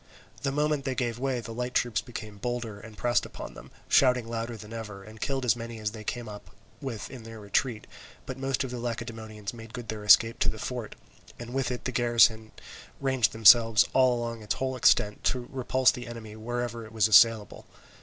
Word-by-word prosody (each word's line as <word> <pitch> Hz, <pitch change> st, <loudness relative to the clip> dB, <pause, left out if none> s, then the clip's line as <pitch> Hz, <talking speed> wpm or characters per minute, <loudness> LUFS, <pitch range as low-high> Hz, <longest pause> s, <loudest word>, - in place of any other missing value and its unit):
The 140 Hz, -, -1 dB
moment 150 Hz, 0 st, 0 dB
they 135 Hz, -1 st, -2 dB
gave 120 Hz, -2 st, -2 dB
way, 130 Hz, -2 st, -1 dB
the 115 Hz, -, -8 dB
light 125 Hz, +2 st, -4 dB
troops 120 Hz, -2 st, +1 dB
became 110 Hz, -4 st, -9 dB
bolder 120 Hz, -3 st, -4 dB
and 110 Hz, 0 st, -12 dB
pressed 120 Hz, 0 st, +1 dB
upon -, -, -8 dB
them, -, -, -12 dB, 0.2 s
shouting 125 Hz, -3 st, +4 dB
louder 115 Hz, 0 st, -4 dB
than 105 Hz, +1 st, -11 dB
ever, 105 Hz, -4 st, -7 dB
and 110 Hz, +1 st, -13 dB
killed 135 Hz, -2 st, -1 dB
as 120 Hz, -, +4 dB
many 115 Hz, -1 st, -7 dB
as 105 Hz, -1 st, -3 dB
they 110 Hz, -1 st, -9 dB
came 120 Hz, +2 st, -4 dB
up 105 Hz, -1 st, -10 dB, 0.3 s
with 125 Hz, -6 st, -5 dB
in 130 Hz, -, -9 dB
their 115 Hz, 0 st, -10 dB
retreat, 105 Hz, +3 st, -1 dB, 0.4 s
but 130 Hz, -, -5 dB
most 135 Hz, 0 st, -1 dB
of 130 Hz, -, -5 dB
the 125 Hz, -, -5 dB
Lacedaemonians 115 Hz, -3 st, -5 dB
made 115 Hz, -1 st, -10 dB
good 120 Hz, -3 st, -8 dB
their 110 Hz, -1 st, -5 dB
escape 115 Hz, +2 st, +6 dB
to -, -, +2 dB
the 110 Hz, -, -4 dB
fort, 120 Hz, -1 st, -5 dB, 0.4 s
and 120 Hz, +1 st, -8 dB
with 135 Hz, -2 st, 0 dB
the 125 Hz, +1 st, -3 dB
garrison 120 Hz, -2 st, +4 dB
in 110 Hz, -, -16 dB
it -, -, -19 dB, 0.4 s
ranged 130 Hz, -5 st, +2 dB
themselves 115 Hz, -1 st, +7 dB
all 130 Hz, -2 st, +4 dB
along 115 Hz, -1 st, -4 dB
its 105 Hz, 0 st, -2 dB
whole 130 Hz, 0 st, -2 dB
extent 105 Hz, -4 st, +3 dB
to 125 Hz, -1 st, 0 dB
repulse 130 Hz, -1 st, +2 dB
the 120 Hz, 0 st, -8 dB
enemy 110 Hz, -2 st, -8 dB
wherever 120 Hz, +1 st, -4 dB
it 110 Hz, 0 st, -12 dB
was 110 Hz, -2 st, +3 dB
assailable. 110 Hz, 0 st, +4 dB
115 Hz, 210 wpm, -28 LUFS, 110-125 Hz, 0.4 s, themselves